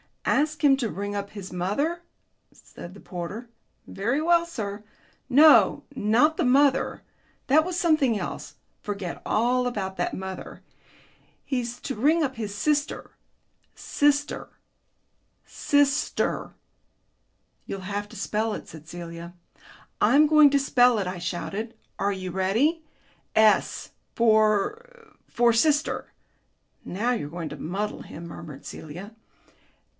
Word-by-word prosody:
"Ask 305 +1 +1
him 275 -2 +6
to 240 -5 -2
ring 205 +1 -4
up 200 0 -4
his 195 -3 -9
mother," 280 - -1 0.5
said 175 +3 -12
the - - -12
porter. 195 +8 -7 0.4
"Very 235 +9 -1
well, 340 +1 +3
sir." 210 -9 -5 0.5
"No, 295 +4 +6
not 250 +8 +3
the - - +1
mother. 275 +2 +2 0.4
That 300 +3 +5
was 360 -1 -3
something 300 -9 +2
else. - - -6 0.2
Forget 200 -4 -5
all 250 +3 +1
about 190 -5 -4
that - - -1
mother. 190 0 -7 0.8
He's 245 -3 -3
to 270 - -4
ring 310 +8 +3
up 265 -2 -2
his 210 -3 -4
sister... 290 +6 -1 0.6
sister... 290 0 0 1.0
SISTER." 285 0 0 1.1
"You'll 195 - -5
have 205 +2 -4
to 225 - -13
spell 215 +2 -1
it," - - -7
said 155 -1 -12
Celia. 170 0 -8 0.6
"I'm 300 +2 +5
going 305 -1 +7
to 280 - +3
spell 250 -3 +4
it," 200 - -1
I 180 0 -4
shouted. 195 +6 -4 0.2
"Are 200 - +1
you 185 -1 -5
ready?... 225 - +1 0.5
S 220 -1 +3 0.2
for 235 - +1
for 235 0 +3
sister." 300 +5 +1 0.7
"Now 220 +7 -1
you're 220 -12 -2
going 165 -1 -5
to - - -8
muddle 200 +6 -4
him," 170 +2 -9
murmured 150 -4 -10
Celia. 175 +8 -9
225 Hz, 125 wpm, -25 LUFS, 195-285 Hz, 1.1 s, going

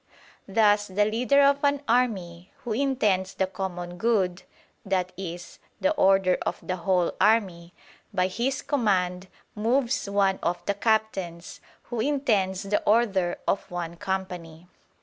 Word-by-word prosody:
Thus 205 0 +3
the 205 +2 +1
leader 250 +6 +3
of 280 +1 +3
an 285 0 +1
army, 190 -8 0
who 230 - -2
intends 210 -8 0
the 190 - +1
common 180 -2 -6
good 195 -6 +1 0.5
i.e. 180 -1 -2 0.4
the 285 - +2
order 195 -9 +3
of - - -2
the 185 - -2
whole 180 0 +1
army 190 -5 +1 0.4
by 185 -3 +1
his 240 +8 -2
command 190 -8 0 0.3
moves 235 +2 0
one 195 -1 +2
of 175 +1 -2
the 200 - +1
captains, 200 -5 -2 0.3
who 240 - -2
intends 220 -8 0
the 200 +1 0
order 200 -6 +2
of 195 - -1
one 175 -2 -5
company. 180 -3 -5
195 Hz, 130 wpm, -26 LUFS, 180-225 Hz, 0.5 s, Thus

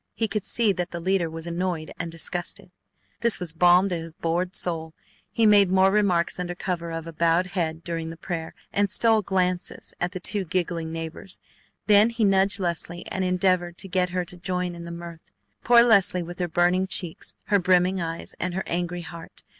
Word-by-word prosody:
He 225 - 0
could 210 -1 -3
see 230 -3 +2
that 180 -2 -3
the 170 - -6
leader 180 -1 0
was 165 0 -7
annoyed 170 -2 -3
and 170 -1 -4
disgusted. 175 +3 -1 0.5
This 235 -1 +2
was 180 -3 -2
balm 180 +3 +5
to 180 - -1
his 165 -1 -6
bored 175 +3 -2
soul. 160 -2 -1 0.4
He 230 - +2
made 205 -3 +6
more 190 +1 +4
remarks 185 -5 +1
under 175 0 -3
cover 175 -2 -3
of 165 -1 -5
a 165 - -8
bowed 165 +2 +2
head 165 -3 -3
during 165 -2 -4
the 165 - -8
prayer, 165 -1 -5 0.2
and 205 0 +2
stole 220 +2 +3
glances 180 -2 -2
at 175 0 0
the 185 - -5
two 200 +2 +3
giggling 170 -2 -2
neighbors. 165 +3 -5 0.5
Then 210 +2 +6
he 230 -2 0
nudged 195 +1 +3
Leslie 175 -1 -3
and 190 - -1
endeavored 180 -1 +1
to - - -4
get 180 -1 0
her 180 0 -2
to 180 0 -6
join 180 0 -3
in 170 0 -9
the 170 - -7
mirth. 170 -1 -9 0.3
Poor 235 0 +7
Leslie 195 -6 +4
with 175 +1 -9
her 175 - 0
burning 175 +2 +2
cheeks, 175 -3 -2
her 205 - +4
brimming 180 0 +2
eyes, 165 0 -5
and 180 0 -2
her 190 - -2
angry 175 0 -2
heart! 170 0 -10
180 Hz, 200 wpm, -25 LUFS, 170-190 Hz, 0.5 s, Poor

